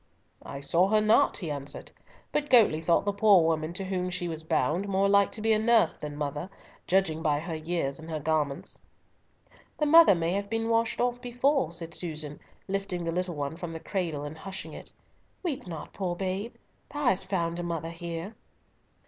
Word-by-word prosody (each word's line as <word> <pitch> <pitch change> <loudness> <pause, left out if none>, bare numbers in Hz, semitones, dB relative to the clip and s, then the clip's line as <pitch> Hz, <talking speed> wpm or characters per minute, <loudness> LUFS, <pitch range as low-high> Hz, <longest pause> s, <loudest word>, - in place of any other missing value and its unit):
"I 140 - -8
saw 170 +6 +3
her 215 +2 +4
not," 215 +1 +4
he 165 -5 -4
answered, 140 -1 -5 0.4
"but 295 -1 -1
Goatley 220 -11 +5
thought 170 +3 +3
the 205 - +1
poor 200 -3 +6
woman 160 0 0
to 190 +2 -4
whom 185 -1 -2
she 180 -1 -3
was 160 -1 -4
bound 160 +5 0
more 195 0 +2
like 200 0 +4
to 215 - -6
be 220 0 +4
nurse 220 -6 +4
than 150 -1 -7
mother, 150 +4 -3 0.4
judging 175 -4 +2
by 150 -3 +2
her 165 +2 -5
years 155 -3 -2
and 160 +1 -10
her 155 -1 -2
garments." 150 -2 -1 1.0
"The 300 - +1
mother 325 - +8
may 165 0 0
have 200 +1 -2
been 225 +1 -1
washed 230 0 +1
off 245 0 0
before," 245 - +1
said 165 -1 -6
Susan, 155 -4 -3 0.3
lifting 195 -2 -2
the 165 - -1
little 180 0 -2
one 145 +1 -3
from 175 -1 -6
the 165 - -5
cradle, 165 -6 -3
and 145 +1 -6
hushing 190 +2 -7
it. - - -9 0.5
"Weep 295 - -3
not, 165 -3 -7
poor 180 -3 -2
babe, 195 +5 -3 0.4
thou 295 0 -4
hast 195 -6 +2
found 170 -3 -1
a - - -3
mother 165 -1 -3
here." 170 +3 -6
175 Hz, 190 wpm, -28 LUFS, 160-200 Hz, 1.0 s, mother